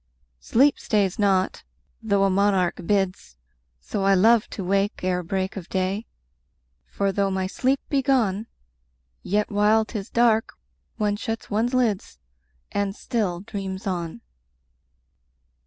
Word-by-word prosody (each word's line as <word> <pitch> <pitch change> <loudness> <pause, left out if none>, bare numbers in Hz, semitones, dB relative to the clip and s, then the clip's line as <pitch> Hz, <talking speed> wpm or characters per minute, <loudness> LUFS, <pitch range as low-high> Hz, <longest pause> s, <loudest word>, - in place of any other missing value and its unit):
10 - - -17
Sleep 275 +5 +5
stays 200 -3 0
not, 195 -2 +2 0.4
though 200 -3 +2
a 195 - +4
monarch 190 -2 +2
bids: 190 - -1 0.4
So 125 - -3
I 195 0 +4
love 220 +4 +4
to 195 - -5
wake 195 +2 0
ere 180 -1 0
break 190 +2 -2
of 190 -3 -7
day: 190 +4 -1 0.8
For 200 -1 -1
though 195 0 +1
my 190 -1 -1
sleep 260 +8 0
be 280 -2 +1
gone, 230 -6 +1 0.7
Yet 210 +3 0
while 210 +2 +3
'tis 210 -3 -6
dark, 230 -2 +2 0.4
one 205 -1 0
shuts 225 +1 -5
one's 230 +5 +1
lids, 215 - 0 0.5
And 200 -1 -1
still 195 -9 -2
dreams 195 -2 -6
on. 170 - -3
200 Hz, 135 wpm, -24 LUFS, 190-220 Hz, 0.8 s, Sleep